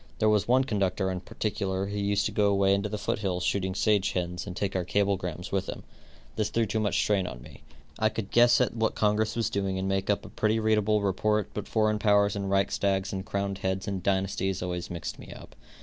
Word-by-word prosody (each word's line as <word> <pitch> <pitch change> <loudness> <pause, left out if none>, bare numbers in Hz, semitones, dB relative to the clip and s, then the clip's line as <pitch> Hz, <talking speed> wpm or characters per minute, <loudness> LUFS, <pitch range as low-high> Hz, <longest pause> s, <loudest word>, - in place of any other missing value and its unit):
There 110 - +3
was 105 -2 +2
one 130 +2 +4
conductor, 95 -5 0
in 90 - -3
particular, 95 -1 -2
who 100 +1 -4
used 100 0 +1
to - - -1
go 105 -1 +2
away 100 -1 +3
into 100 +2 0
the 105 - -3
foot 105 - -2
hills 90 -3 -2
shooting 95 0 0
sage 105 -2 +2
hens 90 +1 -3
and 90 - -6
take 100 0 -2
our 95 - +1
cablegrams 90 -3 -1
with 95 -1 -1
him. - - -6 0.5
This 110 -1 0
threw 115 0 +1
too 110 +1 -1
much 105 -1 0
strain 100 -3 +1
on - - -8
me. - - -14 0.4
I 110 - +3
could 110 -3 -5
guess 120 0 +5
at 125 -2 +1
what 110 -1 0
congress 105 +1 +1
was 115 -2 0
doing 95 -1 -1
and 95 0 -2
make 95 0 -1
up 100 - +1
a - - -9
pretty 110 +1 +1
readable 110 -1 +2
report, 105 +2 0
but 105 - -5
foreign 110 -1 +1
powers 105 -1 +3
and 100 -1 -3
reichstags 95 0 +1
and 95 -1 -3
crowned 100 0 -3
heads 95 0 -2
and 100 -2 -2
dynasties 95 0 0
always 90 -1 -4
mixed 75 -4 -5
me - - -11
up. - - -13
100 Hz, 225 wpm, -28 LUFS, 95-105 Hz, 0.5 s, guess